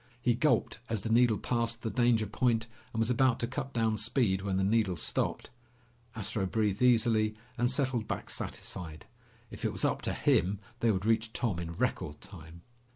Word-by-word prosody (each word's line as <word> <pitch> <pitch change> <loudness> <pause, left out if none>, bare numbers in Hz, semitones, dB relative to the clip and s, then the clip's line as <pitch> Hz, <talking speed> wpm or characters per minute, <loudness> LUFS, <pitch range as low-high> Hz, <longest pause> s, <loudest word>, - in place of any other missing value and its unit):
He 120 0 +2
gulped 150 0 +1
as 110 -3 -2
the 110 - -2
needle 115 -2 +4
passed 115 0 -1
the 110 - -2
danger 120 -3 +3
point 115 +1 +1 0.3
and - - -7
was 115 +2 +2
about 125 0 +3
to - - +2
cut 135 +2 -4
down 110 -3 +1
speed 110 -3 +1
when 95 -1 -1
the 95 - +1
needle 105 -2 +2
stopped. - - -1 0.6
Astro 100 -2 -2
breathed 105 0 0
easily 115 -3 +3 0.2
and 120 0 +1
settled 130 -4 -1
back - - -4
satisfied. 80 -4 -6 0.5
If - - -9
it - - +1
was - - -1
up - - 0
to - - -1
him, 95 +3 +2 0.2
they 115 - +2
would 95 -2 0
reach 115 0 +1
Tom 105 -8 -1
in 85 -1 -5
record 75 -2 -2
time. 85 -4 -11
110 Hz, 185 wpm, -31 LUFS, 100-120 Hz, 0.6 s, needle